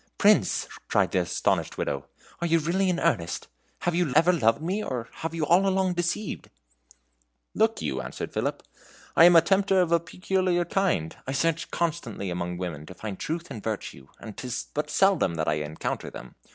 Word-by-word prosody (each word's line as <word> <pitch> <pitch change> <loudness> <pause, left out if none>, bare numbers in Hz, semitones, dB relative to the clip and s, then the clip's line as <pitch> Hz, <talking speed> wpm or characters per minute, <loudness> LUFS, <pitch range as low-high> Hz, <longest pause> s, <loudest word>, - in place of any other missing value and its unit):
"Prince!" - - +3 0.2
cried - - +2
the - - +2
astonished - - 0
Widow, 70 -1 -2 0.3
"are 170 - 0
you 165 0 +4
really 180 +5 +1
in 180 - 0
earnest? 90 - 0 0.3
Have 175 - 0
you 170 -4 +1
ever 180 +2 +5
loved 115 -9 +3
me, 185 +7 -2
or 120 - -4
have 165 0 -4
you 160 -2 0
all 185 +5 +4
along 190 -1 +2
deceived?" 175 +4 -2 1.0
"Look - - +1
you," 65 - -2
answered - - -6
Philip, - - -2 0.5
"I 165 - +8
am 175 0 +7
a 165 - +9
tempter 195 +2 +3
of 175 -2 +2
a 170 - +5
peculiar 180 +1 0
kind. 170 - 0
I 135 - -2
search 165 +3 0
constantly 115 - -2
among 90 0 -3
women 80 -4 -5
to 90 - -10
find 105 -3 -6
truth 170 +2 -4
and 110 - -6
virtue, 100 -11 -5
and 110 -3 -9
'tis 125 -1 -5
but 150 - -2
seldom 190 - +3
that 80 -1 -2
I 75 0 +1
encounter 75 +1 -4
them. 60 - -10
165 Hz, 185 wpm, -26 LUFS, -, 1.0 s, a